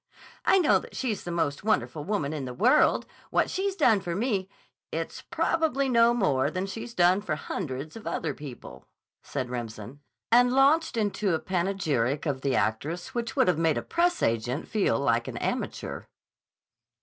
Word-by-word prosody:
"I 385 - +5
know 350 -5 +4
that - - -12
she's 230 -7 -2
the - - -4
most 160 -4 -1
wonderful 205 -8 0
woman 170 -6 -1
in 145 -4 -4
the 125 -1 -6
world. - - +4 0.2
What - - +1
she's 390 0 -1
done 235 - +4
for 175 -2 -3
me—" 200 -3 -1 0.4
"It's - - -4
probably 310 -5 0
no 235 -1 +5
more 150 - +2
than 185 +1 -3
she's 225 +4 -7
done 180 +2 +4
for 165 -7 -2
hundreds 150 -2 -5
of 225 - -9
other 155 -3 -2
people," 135 -3 -10 0.3
said 125 -1 -4
Remsen, 120 +1 -6 0.3
and 245 +1 +6
launched 275 +1 +3
out - - +2
into 205 -3 0
a - - -1
panegyric 170 -8 -1
of 140 -4 -2
the 135 -1 0
actress 160 - -1
which 235 -2 -3
would - - +3
have 175 -3 +2
made 165 -2 +2
a - - -2
press 350 0 +1
agent 120 +5 0
feel 210 -2 +1
like 120 -4 +1
an - - -5
amateur. - - -3
185 Hz, 175 wpm, -27 LUFS, 140-235 Hz, 0.4 s, and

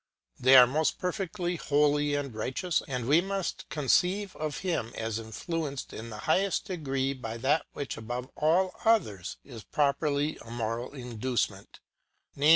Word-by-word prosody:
They 130 +2 +7
are 125 -1 +11
most 150 +5 +1
perfectly 180 -1 -2
holy 145 -1 +2
and 140 -4 -3
righteous; 130 +10 -1
and 125 -3 -3
we 155 +5 +5
must 195 -1 -3
conceive 180 +7 +1
of 150 -3 -3
Him 165 -11 -1
as 110 0 -2
influenced 140 +5 -4
in 115 +1 -7
the 105 -2 -7
highest 195 0 +2
degree 135 -8 -1
by 115 -4 -6
that 145 +6 +1
which, 140 - -4
above 120 +3 -5
all 180 +5 +2
others, 110 - +1
is 120 -5 -10
properly 145 +1 0
a 115 - -12
moral 115 +3 -3
induce 125 -2 -1
ment; 100 0 -15 0.5
viz. 145 +2 +3
140 Hz, 155 wpm, -29 LUFS, 120-165 Hz, 0.5 s, are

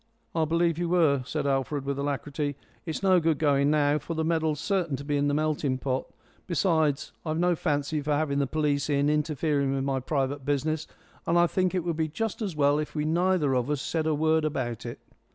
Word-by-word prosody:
"I 160 -1 +1
believe 165 +1 +1
you 175 -1 -1
were," 160 -6 +3
said - - -2
Alfred, 135 +1 -1
with 140 0 -2
alacrity. 145 +1 -2 0.3
"It's 160 +4 -4
no 185 -2 +5
good 160 -2 +1
going 140 -2 +3
now, 150 0 +3
for 165 +4 -5
the 160 0 -1
medal's 160 -2 0
certain 175 -4 0
to 135 - -7
be 145 0 -1
in 145 0 +1
the 145 - +1
melting 150 -3 0
pot. 130 0 -2 0.4
Besides, 160 -4 +1
I've 155 -1 -2
no 175 +1 +2
fancy 150 0 -1
for 150 +1 -1
having 145 -1 0
the 140 - +1
police 145 0 0
in, 145 0 +2
interfering 150 -2 0
with 135 - -1
my 135 -1 0
private 135 +1 -2
business. 150 +3 -1 0.4
And 170 - +3
I 175 - +6
think 185 +1 0
it 180 - 0
would 170 -2 -2
be 160 -1 +1
just 220 +9 -3
as 195 -6 -3
well 145 0 +3
if 155 - -5
we 150 0 -1
neither 170 -3 +2
of 125 +1 0
us 150 -2 0
said 160 +3 -2
a 155 - +2
word 160 +1 +2
about 130 -7 -3
it." - - -6
150 Hz, 220 wpm, -27 LUFS, 140-160 Hz, 0.4 s, I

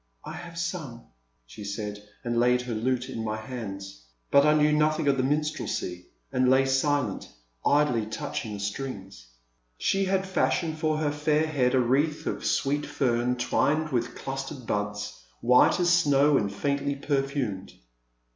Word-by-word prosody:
I - - -6
have 170 -1 -9
sung, 165 -9 -4 0.4
she 105 - -10
said, 105 0 -5 0.2
and 120 -1 0
laid 125 +1 +3
her 125 -1 -4
lute 125 +3 -1
in 115 - -5
my 110 0 -2
hands. 100 - -7 0.3
But 140 +1 +6
I 150 - +5
knew 150 0 +4
nothing 155 0 +2
of 135 -2 +3
minstrelsy 145 - -2 0.2
and 130 0 +2
lay 130 +1 +5
silent, 135 -4 0 0.3
idly 125 -7 +2
touching 110 0 -4
the - - -7
strings. 100 - -5 0.5
She 195 0 +1
had 190 0 +1
fashioned 165 -4 0
for 155 -1 +1
her 155 -1 0
fair 150 +1 +1
head 135 -5 +1
a - - +4
wreath 140 +5 +1
of - - -3
sweet 145 +2 0
fern 125 -2 +1
twined 145 +5 +1
with 120 -3 -1
clustered 135 -1 -5
buds, 105 -1 -3 0.2
white 125 +7 +5
as 175 -1 +3
snow 145 -4 +4
and 100 -6 +1
faintly 140 +6 -1
perfumed. 135 -8 -2
135 Hz, 155 wpm, -27 LUFS, 115-150 Hz, 0.5 s, But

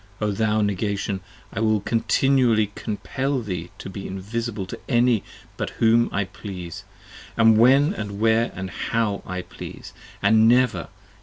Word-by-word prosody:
O 105 -1 0
thou 110 +1 +1
Negation, 100 -1 -1 0.3
I - - -3
will 110 -1 +2
continually 115 0 +2
compell 130 +6 -3
40 130 - 0
Thee 90 -3 -4
to - - -8
be 95 0 -6
invisible 105 +2 -4
to - - -8
any 120 -3 +3 0.3
but - - -2
whom 115 +1 +4
I 100 - 0
please, 90 -3 -8 0.3
& - - -17
when 120 - +5
And 100 - -5
where 115 +1 +3 0.3
& - - -4
how 110 -3 0
I 90 0 -4
please, - - -10 0.3
and 110 0 +5
never! 125 0 +3
110 Hz, 150 wpm, -23 LUFS, 100-115 Hz, 0.3 s, when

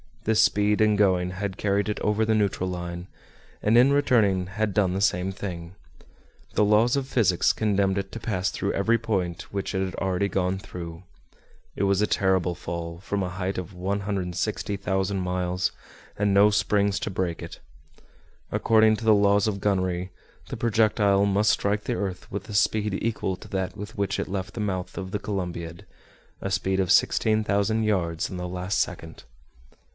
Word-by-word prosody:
This 110 0 +3
speed 105 +1 +3
in 105 -1 +4
going 90 -3 +2
had 95 +1 -4
carried 100 0 0
it 105 - -2
over 105 +1 +1
the 110 - +2
neutral 100 -3 0
line, 90 0 -5 0.5
and 110 +3 +3
in 130 +3 +6
returning 110 -10 +3
had 105 +1 -2
done 95 -3 +2
the 95 - -2
same 90 -1 +1
thing. 90 -3 -7 0.8
The - - +3
laws 110 +4 +4
of 135 -2 -1
physics 105 -9 +2
condemned 100 -2 +1
it 95 0 -6
to 115 - -6
pass 100 -4 -1
through - - -2
every 115 +4 +2
point 95 -7 -3
which 100 0 -3
it 95 - +1
had 95 -1 -4
already 95 +1 0
gone 95 0 0
through. 85 -2 -8 0.7
It - - -1
was 100 0 +2
a 105 - +2
terrible 95 -2 +1
fall, 85 -1 -6
from 100 +2 -3
a 90 - -2
height 95 +1 -3
of 90 +1 -7
160,000 95 +1 -2
miles, 90 0 -1 0.5
and 100 -1 +1
no 100 +1 +6
springs 100 -1 +1
to - - -3
break 90 -3 -2
it. 85 - -9 0.9
According 110 -1 +4
to 115 - -7
the 110 -1 +6
laws 100 0 +3
of 100 -2 -2
gunnery, 95 -2 0 0.4
the - - -5
projectile 105 -3 +3
must 100 +2 +3
strike 105 +1 0
the 120 - -1
earth 95 -4 -4
with 100 +1 -5
a - - -6
speed 105 0 +1
equal 105 -4 -1
to - - -13
that 95 -1 -2
with 105 +3 -8
which 100 -1 -1
it - - -2
left 95 0 -4
the - - -6
mouth 95 -3 -3
of 95 -1 -5
the 105 - -2
Columbiad, 85 -5 -5 0.6
a 100 - -3
speed 95 0 0
of 95 -2 +1
16,000 110 0 +2
yards 85 -6 0
in 90 - -5
the 90 0 -4
last 90 +2 -2
second. 80 0 -4
100 Hz, 180 wpm, -25 LUFS, 90-105 Hz, 0.9 s, in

